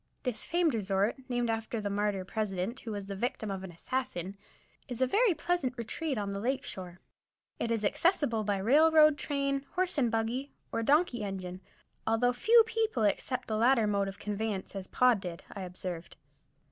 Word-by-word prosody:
This 245 Hz, -5 st, -1 dB
famed 340 Hz, -3 st, +2 dB
resort, 200 Hz, +1 st, 0 dB
named 245 Hz, -1 st, 0 dB
after 225 Hz, +1 st, -3 dB
the 205 Hz, -, -3 dB
martyr 200 Hz, -2 st, 0 dB
President 210 Hz, +3 st, -2 dB
who 225 Hz, -, -7 dB
was 205 Hz, -2 st, -4 dB
the 195 Hz, 0 st, -5 dB
victim 220 Hz, -1 st, -2 dB
of 190 Hz, -1 st, -4 dB
an 190 Hz, -, -6 dB
assassin, 190 Hz, -1 st, -3 dB, 0.5 s
is 245 Hz, -4 st, -6 dB
a 260 Hz, -, +4 dB
very 410 Hz, -, +3 dB
pleasant 295 Hz, -6 st, -1 dB
retreat 270 Hz, +5 st, -3 dB
on 200 Hz, -1 st, -2 dB
the 200 Hz, -, -3 dB
lake 260 Hz, +5 st, -1 dB
shore. 180 Hz, -1 st, -7 dB, 0.6 s
It 235 Hz, -, -1 dB
is 225 Hz, -2 st, 0 dB
accessible 285 Hz, -, +2 dB
by 205 Hz, -1 st, 0 dB
railroad 305 Hz, +8 st, +6 dB
train, 275 Hz, -2 st, -1 dB
horse 360 Hz, -4 st, +1 dB
and 245 Hz, -4 st, +3 dB
buggy, 230 Hz, +5 st, -2 dB, 0.2 s
or 230 Hz, -, -1 dB
donkey 280 Hz, -1 st, +2 dB
engine, 185 Hz, -2 st, -5 dB, 0.5 s
although 235 Hz, +2 st, +3 dB
few 450 Hz, -, +6 dB
people 445 Hz, -, 0 dB
accept 250 Hz, +5 st, 0 dB
the 215 Hz, -, -1 dB
latter 235 Hz, 0 st, +4 dB
mode 200 Hz, -1 st, +1 dB
of 195 Hz, 0 st, -6 dB
conveyance, 210 Hz, -1 st, -3 dB
as 190 Hz, -1 st, -5 dB
Pod 250 Hz, -4 st, +4 dB
did, 175 Hz, -3 st, -7 dB
I 200 Hz, -, -7 dB
observed. 180 Hz, -2 st, -6 dB
225 Hz, 180 wpm, -31 LUFS, 200-270 Hz, 0.6 s, railroad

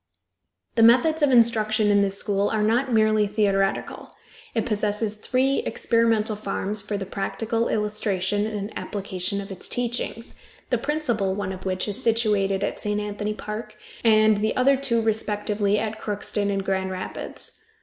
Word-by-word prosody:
The 230 Hz, -, +2 dB
methods 255 Hz, +8 st, +5 dB
of 290 Hz, -, +4 dB
instruction 220 Hz, -3 st, +3 dB
in 205 Hz, 0 st, +4 dB
this 195 Hz, 0 st, 0 dB
school 200 Hz, 0 st, 0 dB
are 215 Hz, -1 st, 0 dB
not 240 Hz, +5 st, +1 dB
merely 215 Hz, -2 st, +3 dB
theoretical. 200 Hz, -2 st, -1 dB, 0.4 s
It 225 Hz, -, +1 dB
possesses 210 Hz, -1 st, 0 dB
three 260 Hz, +5 st, 0 dB
experimental 225 Hz, -2 st, +1 dB
farms 205 Hz, 0 st, -2 dB
for 205 Hz, 0 st, -3 dB
the 195 Hz, -, -4 dB
practical 225 Hz, +4 st, -2 dB
illustration 205 Hz, -1 st, 0 dB
and 210 Hz, -1 st, -5 dB
application 200 Hz, -1 st, -3 dB
of 200 Hz, 0 st, -7 dB
its 190 Hz, -, -5 dB
teachings, 240 Hz, -1 st, -3 dB, 0.3 s
the -, -, +2 dB
principal 235 Hz, -11 st, -1 dB
one 200 Hz, -2 st, -3 dB
of 185 Hz, -, -10 dB
which 185 Hz, +1 st, -1 dB
is 205 Hz, -, -3 dB
situated 205 Hz, -4 st, +2 dB
at -, -, -2 dB
St. 210 Hz, 0 st, -1 dB
Anthony 210 Hz, 0 st, -3 dB
Park, 215 Hz, 0 st, -6 dB, 0.3 s
and 215 Hz, -2 st, +4 dB
the 220 Hz, -, +1 dB
other 270 Hz, +2 st, +4 dB
two 250 Hz, -4 st, +1 dB
respectively 210 Hz, -1 st, 0 dB
at 215 Hz, 0 st, -3 dB
Crookston 205 Hz, 0 st, -2 dB
and 195 Hz, -1 st, -1 dB
Grand 190 Hz, -1 st, -1 dB
Rapids. 185 Hz, 0 st, -5 dB
210 Hz, 155 wpm, -24 LUFS, 200-225 Hz, 0.4 s, methods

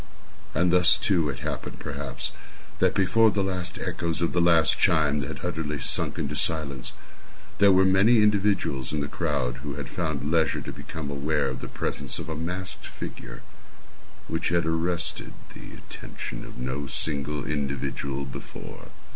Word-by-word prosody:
And 90 Hz, 0 st, +3 dB
thus, 90 Hz, -1 st, +6 dB
too, 85 Hz, -7 st, +2 dB
it 65 Hz, -, -5 dB
happened, -, -, -4 dB
perhaps, -, -, -4 dB, 0.5 s
that -, -, +3 dB
before 110 Hz, +4 st, +5 dB
the 100 Hz, -2 st, 0 dB
last 90 Hz, -2 st, -3 dB
echoes 85 Hz, -1 st, -1 dB
of 85 Hz, -, 0 dB
the 85 Hz, -, +3 dB
last 85 Hz, -2 st, +4 dB
chime 75 Hz, -2 st, +3 dB
had 70 Hz, +2 st, -5 dB
utterly 80 Hz, -4 st, -2 dB
sunk -, -, 0 dB
into 70 Hz, +1 st, -2 dB
silence, 70 Hz, -5 st, -1 dB, 0.7 s
there 100 Hz, -1 st, +7 dB
were 95 Hz, 0 st, +6 dB
many 95 Hz, +5 st, +5 dB
individuals 100 Hz, -10 st, +2 dB
in 75 Hz, -, 0 dB
the 70 Hz, -, -2 dB
crowd 70 Hz, -6 st, -1 dB
who 70 Hz, +1 st, -5 dB
had 70 Hz, -3 st, -5 dB
found 80 Hz, -4 st, -2 dB
leisure 80 Hz, -3 st, +2 dB
to -, -, -6 dB
become 75 Hz, +1 st, -6 dB
aware 75 Hz, +2 st, 0 dB
of 65 Hz, -1 st, -5 dB
the -, -, -6 dB
presence -, -, -2 dB
of -, -, -5 dB
a 80 Hz, -, -3 dB
masked 90 Hz, +4 st, -4 dB
figure -, -, -8 dB, 0.8 s
which 80 Hz, +1 st, -1 dB
had 85 Hz, -1 st, +2 dB
arrested 85 Hz, +1 st, -1 dB, 0.2 s
the -, -, -10 dB
attention -, -, -8 dB
of -, -, -11 dB
no 65 Hz, +3 st, -3 dB
single 75 Hz, +1 st, +1 dB
individual 70 Hz, -1 st, -2 dB
before. 65 Hz, -, -9 dB
80 Hz, 160 wpm, -26 LUFS, 70-90 Hz, 0.8 s, there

